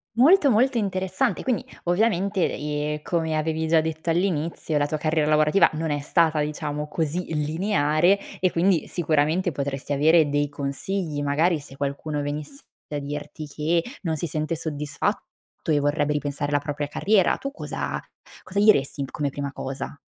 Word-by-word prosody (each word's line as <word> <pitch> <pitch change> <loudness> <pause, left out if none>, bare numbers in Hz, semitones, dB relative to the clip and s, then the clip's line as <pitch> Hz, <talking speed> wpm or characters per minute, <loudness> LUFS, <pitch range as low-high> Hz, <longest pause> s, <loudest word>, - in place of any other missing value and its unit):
Molto, 290 +4 +6
molto 250 +3 +3
interessante. 190 +4 0
Quindi 250 -6 0 0.2
ovviamente, 195 0 +1
ehm, 150 0 -2
come 160 -2 -1
avevi 160 +1 -1
già 165 -1 +5
detto 160 +1 -3
all'inizio, 165 -3 0
la 145 0 +2
tua 155 - -1
carriera 155 -1 +1
lavorativa 155 +4 +4
non 160 0 -2
è 145 - 0
stata, 155 +1 +2
diciamo, 150 0 -3
così 165 +2 -2
lineare 155 +3 +2 0.2
e 185 - +3
quindi, 175 -2 +2
sicuramente 160 +2 +1
potresti 140 0 -3
avere 155 +2 +4
dei 145 0 +1
consigli, 145 +3 -3
magari 155 +3 +2
se 135 -1 -12
qualcuno 145 +2 -3
venisse 150 - -5 0.2
a 145 - -3
dirti 145 +1 -6
che 160 +3 0 0.2
non 160 -3 -1
si 170 - -2
sente 155 +2 -2
soddisfatto 150 0 -4
e 150 - +4
vorrebbe 145 +1 +1
ripensare 145 0 -2
alla 145 - +3
propria 145 0 -3
carriera. 195 +5 +2
Tu, 275 - -5
cosa 295 - -4 0.4
cosa 195 - -5
gli 210 +1 +8
resti 140 +1 -1
come 145 -2 -1
prima 140 0 -4
cosa? 135 +1 -5
155 Hz, 160 wpm, -24 LUFS, 145-175 Hz, 0.4 s, gli